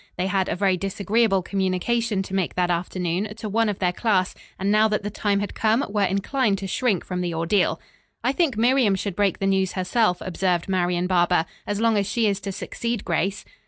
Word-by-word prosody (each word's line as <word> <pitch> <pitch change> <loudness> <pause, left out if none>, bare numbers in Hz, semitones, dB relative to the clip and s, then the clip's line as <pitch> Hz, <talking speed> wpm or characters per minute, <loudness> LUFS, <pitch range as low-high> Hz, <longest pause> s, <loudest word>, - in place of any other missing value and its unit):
They 180 - 0
had 190 0 0
a - - -1
very 190 0 +2
disagreeable 195 +1 +1
communication 195 +3 0
to 195 - -9
make 190 -3 -1
that 180 -1 +1
afternoon, 180 +3 -2
to 220 0 -6
one 225 +1 +1
of 205 - -2
their 180 -1 0
class, 195 -3 +1 0.2
and 195 +1 0
now 215 +1 +5
that 210 -1 -1
the 205 - -3
time 205 -1 0
had 205 - -4
come 225 +4 +1
were 205 0 -1
inclined 200 +4 +1
to 195 - -6
shrink 200 -1 0
from 180 -1 -3
the 175 -2 -2
ordeal. 170 +4 +1 0.4
"I 255 - +2
think 275 -6 0
Miriam 240 -3 +3
should 190 -1 -4
break 200 -2 +1
the 195 - -2
news 190 -1 +1
herself," 185 0 +1
observed 180 -1 -1
Marian 180 -2 0
Barber, 175 -2 +2 0.2
"as 205 0 -2
long 225 -2 +3
as 200 - -1
she 230 -2 +1
is 200 -2 +1
to 200 0 -5
succeed 235 +3 -4
Grace." 190 +4 -1
195 Hz, 210 wpm, -24 LUFS, 185-215 Hz, 0.4 s, now